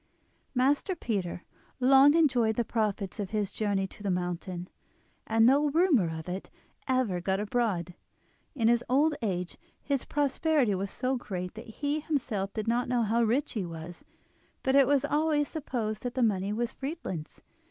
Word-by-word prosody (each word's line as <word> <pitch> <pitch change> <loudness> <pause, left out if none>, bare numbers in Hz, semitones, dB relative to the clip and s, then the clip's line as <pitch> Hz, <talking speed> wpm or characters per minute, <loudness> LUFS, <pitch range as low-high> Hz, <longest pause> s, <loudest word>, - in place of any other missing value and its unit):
Master 285 +9 +2
Peter 195 - -3 0.4
long 270 +3 +6
enjoyed 250 -9 +3
the 235 - 0
profits 215 -3 -2
of 200 -2 -3
his 210 -2 -2
journey 200 -3 0
to 190 - -12
the 200 - -2
mountain, 180 0 -3 0.6
and 225 0 +4
no 285 +4 +4
rumour 295 - +3
of 160 - -8
it 185 +2 -5 0.4
ever 255 -9 +1
got 190 +2 0
abroad. 205 -5 -1 0.6
In 230 -5 +2
his 240 +1 +3
old 295 +5 +3
age 180 -5 -3 0.2
his 280 -3 -2
prosperity 290 -4 +1
was 195 +1 -2
so 255 +5 -1
great 180 -6 -5
that 220 - -10
he 285 +7 -2
himself 245 - -2
did 215 0 -4
not 240 +2 +1
know 245 -2 +2
how 225 +2 +1
rich 245 +6 +1
he 210 - -2
was; 165 0 -8 0.6
but 265 0 +2
it 275 -2 +6
was 285 0 +3
always 295 0 +1
supposed 235 -9 -3
that 245 -1 -4
the 255 - +2
money 200 -3 +1
was 235 +3 -2
Friedlin's. 265 - -6
230 Hz, 165 wpm, -29 LUFS, 195-275 Hz, 0.6 s, long